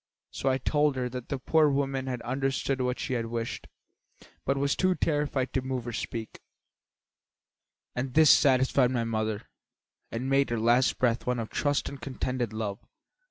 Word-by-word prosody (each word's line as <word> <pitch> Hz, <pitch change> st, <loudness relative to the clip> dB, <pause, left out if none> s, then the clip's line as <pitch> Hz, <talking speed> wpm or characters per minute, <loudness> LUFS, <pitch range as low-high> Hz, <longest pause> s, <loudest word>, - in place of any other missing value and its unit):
So -, -, -1 dB
I 130 Hz, -, +2 dB
told 145 Hz, +2 st, +1 dB
her 125 Hz, -1 st, -2 dB
that 125 Hz, -1 st, -7 dB
the 140 Hz, -, -1 dB
poor 155 Hz, +4 st, +3 dB
woman 135 Hz, -1 st, -1 dB
had 125 Hz, -2 st, -3 dB
understood 135 Hz, +1 st, -1 dB
what 125 Hz, 0 st, 0 dB
she 130 Hz, -, -2 dB
wished, 115 Hz, 0 st, -4 dB, 0.8 s
but 135 Hz, +1 st, +2 dB
was 140 Hz, +1 st, +1 dB
too 185 Hz, -1 st, +2 dB
terrified 145 Hz, -5 st, 0 dB
to 130 Hz, -, +1 dB
move 130 Hz, -2 st, -3 dB
or 120 Hz, -, -5 dB
speak; 115 Hz, -1 st, -5 dB, 1.6 s
and 125 Hz, +1 st, -3 dB
this 155 Hz, -1 st, +8 dB
satisfied 130 Hz, -1 st, +4 dB
my 120 Hz, -2 st, 0 dB
mother 110 Hz, -2 st, -2 dB, 0.6 s
and 120 Hz, +3 st, -3 dB
made 135 Hz, +1 st, +3 dB
her 120 Hz, -1 st, -1 dB
last 120 Hz, +3 st, +3 dB
breath 120 Hz, -1 st, +1 dB
one 125 Hz, 0 st, +1 dB
of 115 Hz, -2 st, -4 dB
trust 145 Hz, -1 st, 0 dB
and 140 Hz, -, -7 dB
contented 130 Hz, -3 st, -3 dB
love. 110 Hz, -2 st, -3 dB
130 Hz, 165 wpm, -28 LUFS, 120-135 Hz, 1.6 s, this